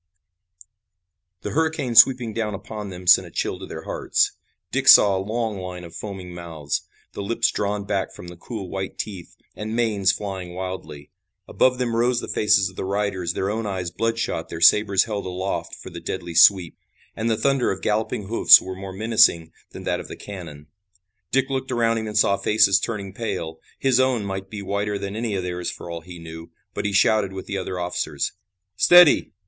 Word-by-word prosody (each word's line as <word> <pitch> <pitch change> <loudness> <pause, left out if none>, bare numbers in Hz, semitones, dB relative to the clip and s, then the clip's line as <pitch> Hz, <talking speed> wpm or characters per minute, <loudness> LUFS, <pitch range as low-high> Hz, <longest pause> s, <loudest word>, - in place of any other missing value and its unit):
The - - -4
hurricane 160 -5 -1
sweeping 120 -1 +6
down 105 -2 -2
upon 105 +1 -7
them 90 -1 -9
sent 90 - +6
a - - -12
chill - - -3
to - - -8
their - - -8
hearts. - - 0 0.4
Dick - - -2
saw 100 -2 +8
a 95 - -1
long 110 0 -3
line 90 -1 -7
of 85 - -11
foaming 95 -4 -7
mouths, 80 -4 -4 0.3
the - - -6
lips 115 +3 0
drawn 105 0 -2
back 100 -1 -2
from 90 - -11
the 85 - -10
cruel 100 +2 -7
white 95 +1 -5
teeth, 95 -5 -7 0.2
and 110 +1 -5
manes 105 -5 +2
flying 95 -3 -6
wildly. 90 -6 -7 0.4
Above 130 0 +2
them 120 -2 -1
rose 120 +1 +2
the - - -6
faces 105 -2 +2
of 95 - -11
the - - -3
riders, 95 -3 -2
their 95 +2 -2
own 110 0 -3
eyes 95 -3 -4
bloodshot, 115 -7 -2
their 85 - -6
sabers 100 +2 +5
held 105 -4 -4
aloft 95 +1 -4
for - - -11
the - - -7
deadly 85 -2 -5
sweep. 85 +1 +5 0.4
And 110 +1 -2
the 110 - +1
thunder 135 +2 +1
of 95 - -6
galloping 105 0 -1
hoofs 110 +4 +7
was 95 0 -7
more 95 0 -7
menacing 95 -6 +3 0.2
than - - -10
that - - -1
of - - -8
the - - -9
cannon. 85 -7 -9 0.6
Dick 135 +1 +1
looked 130 0 -3
around 115 -2 +1
him 110 - -5
and 105 0 -3
saw 100 -2 +3
faces 105 -3 +3
turning 100 -4 -5
pale. 80 -7 -5 0.2
His 130 -2 +2
own 130 -5 +1
might 95 0 -5
be 105 -1 -7
whiter 100 +1 -2
than 100 +1 -5
any 110 -2 -2
of 95 - -2
theirs 90 -1 -3
for 85 - -8
all 85 -1 -6
he 85 +1 -11
knew, 80 0 -10 0.2
but - - -4
he 100 - 0
shouted 100 0 +2
with 95 - -7
the 100 - -4
other 90 -1 -5
officers: 90 0 -2 0.4
"Steady! 175 - +6
100 Hz, 195 wpm, -23 LUFS, 90-110 Hz, 0.6 s, saw